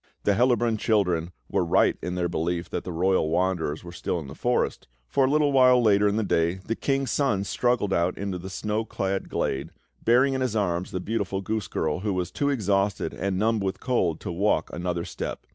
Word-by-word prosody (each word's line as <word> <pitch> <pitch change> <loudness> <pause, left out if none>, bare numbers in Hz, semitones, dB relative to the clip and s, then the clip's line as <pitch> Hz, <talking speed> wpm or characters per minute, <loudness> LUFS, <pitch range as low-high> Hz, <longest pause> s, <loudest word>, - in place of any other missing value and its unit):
The 100 - +3
Hellabrunn 120 0 +2
children 90 -7 +1 0.2
were 95 - +1
right 85 - +3
in 90 0 -3
their 90 -1 0
belief 85 +1 -2
that - - -3
the 90 - -4
royal 90 -1 +1
wanderers 85 -2 0
were 85 - -9
still 85 0 -3
in 80 - -7
the 70 - -9
forest; 120 +9 -1 0.2
for, 135 - +2
a - - +1
little 145 -1 +2 0.3
later 105 -1 +4
in 100 - +1
the 110 - +1
day, 85 -2 +1
the 95 +4 -4
King's 135 -1 -1
Son 105 -9 +1
struggled 120 -2 0
out 85 +1 +1
into 95 -2 -3
the 95 +2 -7
snow 105 +3 -2
clad 95 -3 -3
glade, 70 +4 -2 0.3
bearing 130 +4 +4
in 130 - -1
his 125 -4 -1
arms 90 -4 0
the 95 -3 -3
beautiful 100 -1 -2
goose 110 -2 -2
girl, 80 -1 -1
who 100 +1 -1
was 90 -1 -2
too 145 - 0
exhausted 100 -6 0
and 95 -1 -2
numbed 110 +1 +1
with 95 0 -2
cold 90 - 0
to - - -4
walk 100 +5 0
another 85 -1 -2
step. - - -5
95 Hz, 210 wpm, -26 LUFS, 90-110 Hz, 0.3 s, later